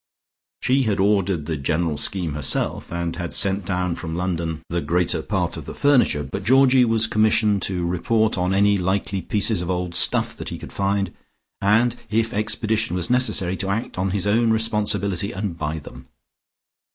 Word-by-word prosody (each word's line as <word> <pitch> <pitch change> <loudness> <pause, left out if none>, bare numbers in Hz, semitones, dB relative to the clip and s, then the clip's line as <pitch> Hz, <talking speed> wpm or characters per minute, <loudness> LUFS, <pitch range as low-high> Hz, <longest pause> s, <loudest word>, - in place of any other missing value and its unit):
She 135 +2 +3
had 110 -6 0
ordered 95 -5 +1
the 80 0 -3
general 75 +3 -1
scheme 85 +1 -2
herself 75 -2 0
and 85 -1 -3
had 85 -1 -3
sent 100 -2 +1
down 90 -2 -1
from 80 -1 -5
London 85 -3 -3
the 85 0 -2
greater 90 +1 0
part - - -2
of - - -8
the - - -8
furniture, 130 - +3
but 95 +9 -6
Georgie 130 +2 +5
was 115 -1 +2
commissioned 110 -2 +2
to 90 -3 -2
report 110 +6 +1
on 90 -1 0
any 100 +1 +3
likely 95 +1 -1
pieces 105 -1 0
of 90 - -4
old 90 -1 -2
stuff - - +1
that - - -6
he - - -5
could - - -10
find, 100 0 -1 0.5
and 110 +4 +3
if 115 +2 0
expedition 110 -1 0
was 90 +4 -2
necessary 125 -8 +2
to 95 - -3
act 105 -1 -3
on 95 +1 0
his 100 +1 -1
own 115 +3 +2
responsibility 105 -3 0
and 95 -4 -4
buy 75 +1 -2
them. 65 -4 -11
95 Hz, 175 wpm, -22 LUFS, 85-110 Hz, 0.5 s, Georgie